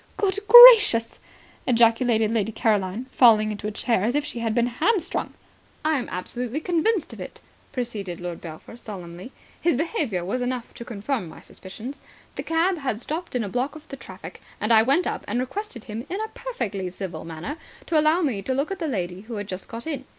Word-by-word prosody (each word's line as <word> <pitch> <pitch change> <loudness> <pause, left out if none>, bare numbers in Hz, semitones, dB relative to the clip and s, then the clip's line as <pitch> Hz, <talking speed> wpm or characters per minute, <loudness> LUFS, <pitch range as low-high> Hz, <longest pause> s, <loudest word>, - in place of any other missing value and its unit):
"Good 400 0 0
gracious," 450 - +9 0.5
ejaculated 230 -2 +3
Lady 225 -1 0
Caroline, 210 0 0
falling 215 -3 +5
into 210 0 -5
a - - -3
chair 225 -1 0
as 235 +5 0
if 295 0 0
she 245 - -6
had 225 -1 -1
been 240 -1 +3
hamstrung. 335 - -1 0.5
"I 310 -2 +2
am 245 - -6
absolutely 245 +8 -4
convinced 350 +3 0
of - - -11
it," - - -9 0.3
proceeded 210 -8 -4
Lord 175 -1 -6
Belpher 160 +6 -10
solemnly. 185 -2 -9 0.3
"His 340 -7 +2
behaviour 280 - -1
was 250 +7 -2
enough 245 -1 -3
to - - -9
confirm 225 - -4
my - - -12
suspicions. 230 +9 -10 0.3
The - - -4
cab 330 +2 0
had 260 -7 -2
stopped 315 +5 -5
in 245 - 0
a - - -4
block 250 +8 -2
of 310 - -12
the - - -6
traffic, 265 - -11 0.2
and 215 +2 +1
I 220 - +7
went 275 +10 +2
up - - -3
and 230 +4 -1
requested 260 - -5
him 225 +5 -7
in 380 - -3
a 440 0 -3
perfectly 205 - -4
civil 185 0 -7
manner 165 - -6 0.3
to 320 - +2
allow 310 +4 +3
me 240 -10 -1
to 260 +6 -2
look 280 +7 -1
at 390 - -4
the 325 - -2
lady 185 -7 -3
who 225 +2 -8
had 205 0 -4
just 185 -1 -7
got 230 0 -8
in. 285 -5 -4
240 Hz, 200 wpm, -24 LUFS, 210-305 Hz, 0.5 s, gracious